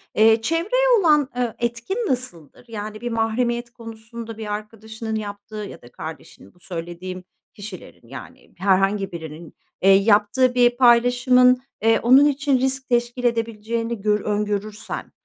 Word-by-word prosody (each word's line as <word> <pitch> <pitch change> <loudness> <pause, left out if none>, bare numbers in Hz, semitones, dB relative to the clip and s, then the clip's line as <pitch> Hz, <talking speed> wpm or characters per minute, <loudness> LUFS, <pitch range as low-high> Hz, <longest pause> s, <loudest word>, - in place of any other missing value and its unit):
eee, 220 +1 +5
çevreye 370 - +1
olan, 300 -6 +3
eee, 245 -3 -1
etkin 235 - -3
nasıldır? 245 - -5
Yani 215 0 -7
bir 240 - -3
mahremiyet 235 +2 -1
konusunda 225 -1 -10
bir 210 -2 -4
arkadaşının 220 +1 -6
yaptığı 205 0 -7
ya 210 -2 -7
da 120 - -16
kardeşinin 160 0 -10
bu 180 - -27
söylediğim 180 +1 -7 0.3
kişilerin 195 - -11
yani 135 - -12
herhangi 195 +1 +1
birinin, 160 -1 -9 0.3
eee, 195 - +4
yaptığı 210 +5 +3
bir 245 0 +3
paylaşımın, 250 +1 +4 0.2
eee, 225 0 +3
onun 260 +5 +6
için 280 -2 +1
risk 265 0 -1
teşkil 240 +1 0
edebileceğini 230 -1 -2
görü 210 -1 +1
öngörürsen 210 +1 -3
225 Hz, 135 wpm, -22 LUFS, 205-245 Hz, 0.3 s, onun